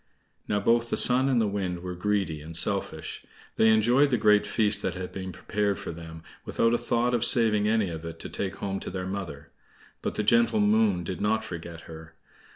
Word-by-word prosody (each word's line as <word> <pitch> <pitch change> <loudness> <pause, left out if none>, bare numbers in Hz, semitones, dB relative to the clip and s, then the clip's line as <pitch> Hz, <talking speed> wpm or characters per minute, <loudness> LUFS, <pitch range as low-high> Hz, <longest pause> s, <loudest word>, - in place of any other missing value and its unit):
Now 105 - 0
both 115 +3 +1
the - - -1
Sun 130 +2 +6
and 125 -3 +2
the 110 - +1
Wind 95 -3 -4
were 90 -1 -5
greedy 90 -4 -2
and 80 +2 -2
selfish. 100 +2 -2 0.3
They 110 - +4
enjoyed 120 +6 +3
the 125 - +1
great 105 -2 +3
feast 105 -2 +2
that - - -3
had 90 0 -7
been 95 -1 -7
prepared 100 +1 -2
for - - -7
them, 80 -1 -11 0.2
without 115 0 0
a 120 - +1
thought 120 +1 -1
of 120 -1 0
saving 110 -4 +5
any 110 -3 +1
of 80 -1 -7
it 85 0 -8
to - - -7
take 95 -2 -4
home 95 -1 -4
to - - -7
their 90 0 -5
mother; 95 -7 -7 0.5
but - - -4
the 105 - -1
gentle 115 +1 +2
Moon 105 -3 +2
did 90 +3 -6
not 110 +2 0
forget 85 -4 -8
her. 80 0 -13
105 Hz, 210 wpm, -26 LUFS, 90-110 Hz, 0.5 s, Sun